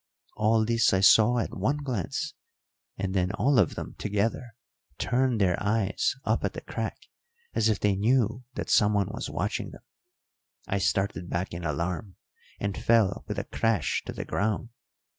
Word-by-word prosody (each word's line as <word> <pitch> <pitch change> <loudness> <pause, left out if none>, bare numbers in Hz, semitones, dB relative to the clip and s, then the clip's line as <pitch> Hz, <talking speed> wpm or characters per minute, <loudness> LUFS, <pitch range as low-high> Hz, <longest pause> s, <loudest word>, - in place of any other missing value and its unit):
All 110 +1 +3
this 115 -2 +3
I 95 - +3
saw 110 +4 +6
at 115 - -2
one 110 +10 0
glance, 140 +2 -3 0.6
and 95 0 -2
then 90 -1 +1
all 135 +4 +3
of 95 - +2
them - - -6
together 110 +3 -1 0.4
turned 125 -2 +1
their 90 -3 +2
eyes 105 +1 +1
up - - +1
at - - -1
the - - -6
crack - - -4 0.6
as 110 - +2
if 110 - +1
they 100 -1 +2
knew 115 +3 +1
that - - -3
someone 105 -2 +3
was 110 - -5
watching - - -2
them. - - -13 0.8
I 100 - 0
started 95 -2 0
back 90 +2 -2
in 85 0 -5
alarm, 85 +5 -3 0.4
and 100 -1 -2
fell 110 -5 +2
with 105 -2 -4
a 100 - -1
crash 110 -9 0
to - - -3
the - - -6
ground. 110 +3 -1
105 Hz, 165 wpm, -27 LUFS, 95-115 Hz, 0.8 s, saw